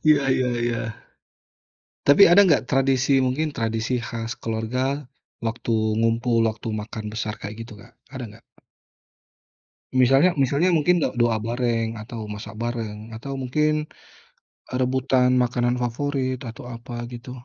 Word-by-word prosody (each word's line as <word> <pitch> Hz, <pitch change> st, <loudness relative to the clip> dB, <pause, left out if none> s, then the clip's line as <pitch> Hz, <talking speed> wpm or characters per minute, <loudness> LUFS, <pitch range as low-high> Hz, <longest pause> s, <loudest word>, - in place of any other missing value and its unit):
Ya 140 Hz, -2 st, +1 dB
ya 130 Hz, -1 st, +2 dB, 0.2 s
ya. 115 Hz, -, -2 dB, 1.2 s
Tapi 145 Hz, +8 st, +8 dB
ada 200 Hz, -, +8 dB
nggak 140 Hz, -5 st, +3 dB
tradisi 135 Hz, 0 st, +3 dB
mungkin 145 Hz, +4 st, 0 dB
tradisi 115 Hz, +1 st, -1 dB
khas 115 Hz, 0 st, -4 dB
keluarga, 125 Hz, +5 st, -2 dB, 0.4 s
waktu 115 Hz, 0 st, -2 dB, 0.3 s
ngumpul 115 Hz, +1 st, +2 dB
waktu 110 Hz, +1 st, -5 dB
makan 110 Hz, 0 st, -5 dB
besar 110 Hz, -1 st, -3 dB
kayak 105 Hz, +2 st, -6 dB
gitu 115 Hz, -2 st, -11 dB
Kak -, -, -17 dB, 0.2 s
ada 130 Hz, -2 st, -5 dB
nggak? 115 Hz, +2 st, -16 dB, 1.5 s
Misalnya 135 Hz, +7 st, +5 dB
misalnya 140 Hz, +7 st, +3 dB
mungkin 170 Hz, +2 st, +3 dB
do -, -, +3 dB
doa 115 Hz, -2 st, +3 dB
bareng 115 Hz, -1 st, 0 dB
atau 115 Hz, +1 st, -8 dB
masak 105 Hz, -1 st, -8 dB
bareng 115 Hz, -3 st, -3 dB, 0.2 s
atau 135 Hz, +4 st, -6 dB
mungkin, 150 Hz, +4 st, +1 dB, 1.0 s
eee, 125 Hz, -, -3 dB
rebutan 130 Hz, 0 st, +2 dB
makanan 120 Hz, 0 st, +1 dB
favorit 130 Hz, +1 st, -1 dB
atau 115 Hz, -, -11 dB
apa 120 Hz, +1 st, -10 dB, 0.2 s
gitu? 120 Hz, +1 st, -8 dB
125 Hz, 135 wpm, -24 LUFS, 115-135 Hz, 1.5 s, Tapi